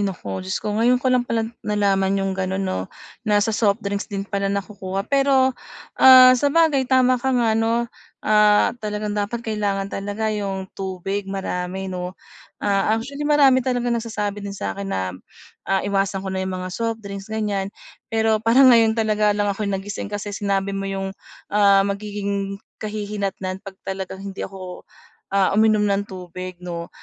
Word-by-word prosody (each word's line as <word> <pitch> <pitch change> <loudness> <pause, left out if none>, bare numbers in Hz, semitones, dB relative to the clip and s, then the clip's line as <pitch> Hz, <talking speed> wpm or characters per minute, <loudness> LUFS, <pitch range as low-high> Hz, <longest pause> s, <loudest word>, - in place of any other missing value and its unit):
naku 135 - -3
Diyos 95 0 -3
ko 210 - -1
ngayon 240 +3 +4
ko 260 - +2
lang 245 -1 +2
pala 225 -1 0 0.2
nalaman 195 -2 +1
yung 195 0 -1
gano'n 190 0 -2
'no, 95 - -3 0.4
na 210 -1 +3
sa 225 - -1
soft 210 -1 +1
drinks 200 +1 -3
din 200 -1 -4
pala 200 -1 -2
nakukuha 195 -1 -3
pero, 270 -1 +3 0.5
ah, 255 -1 +10
sabagay 285 0 +2
tama 255 -1 +4
ka 265 - -1
nga 230 -2 +2
'no, 225 +2 +1 0.4
ah, 210 -1 +4
talagang 210 0 -3
dapat 210 +3 -3
kailangan 200 -3 -2
talaga 205 +2 -2
yung 195 -2 -3
tubig 195 +1 -4
marami 190 -1 -3
'no. 180 0 -5 0.5
Ah, 205 +2 +2
actually 280 +5 -4
marami 275 -3 +5
talagang 245 -1 0
nagsasabi 215 -3 -3
din 200 0 -6
sa'kin 100 - -4
na, 95 -1 -2 0.6
ah, 195 0 +1
iwasan 195 -1 -1
ko 190 - -3
na 190 - -2
yung 190 0 -3
mga 185 0 -5
softdrinks 220 -3 -4
gan'yan. 205 -3 -2 0.4
Pero 220 -1 +1
parang 245 +3 +6
ngayon 225 -1 +4
talaga 210 -2 +2
lang 205 -1 +1
ako'y 200 +1 -3
nagising 200 +1 -4
kasi 205 0 -5
sinabi 200 -1 -1
mo 195 0 -3
yung, 195 0 -3 0.4
ah, 200 -1 +5
magiging 200 -1 -3 0.2
kahihinatnan 200 -3 -4
'pag 195 -2 -10
talagang 190 0 -5
hindi 195 -1 -7
ako, 185 -2 -9 0.5
ah, 195 -1 +3
uminom 215 0 +4
ng 200 0 0
tubig 185 0 -7
'no. 170 -1 -5
200 Hz, 160 wpm, -22 LUFS, 195-220 Hz, 0.6 s, ah